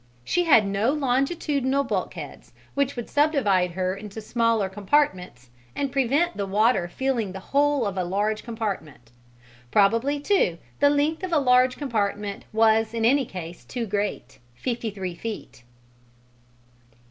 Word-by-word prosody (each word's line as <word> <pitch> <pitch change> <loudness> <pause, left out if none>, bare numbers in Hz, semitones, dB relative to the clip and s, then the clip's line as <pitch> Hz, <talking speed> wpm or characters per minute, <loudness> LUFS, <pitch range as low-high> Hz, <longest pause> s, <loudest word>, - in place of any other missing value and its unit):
She 355 - 0
had 235 -10 +6
no 200 +5 +1
longitudinal 275 0 0
bulkheads, - - -5 0.2
which 280 0 0
would 240 -2 -5
subdivide 215 - +2
her 185 +1 -1
into 210 +1 -8
smaller 230 -2 +1
compartments 190 - -1 0.2
and 275 -2 -2
prevent 280 +6 +1
the 200 -1 -2
water 205 -2 +2
filling 235 -1 -2
the 190 - -6
whole 285 +3 +1
of 195 -2 -2
a - - +1
large 205 +4 -1
compartment. 195 - -5 0.6
Probably, 230 - +2
too, 285 - +1 0.2
the 285 - +5
length 295 +3 +1
of 370 -1 -4
a 330 - +3
large 255 -2 +4
compartment 210 -6 -2
was 220 0 +3
in 225 -1 0
any 270 +3 +4
case 175 -4 -8
too 245 -2 -4
great 205 0 -3 0.2
fifty 235 - -3
three 190 -3 -5
feet. 210 - -7
225 Hz, 140 wpm, -25 LUFS, 195-275 Hz, 0.6 s, had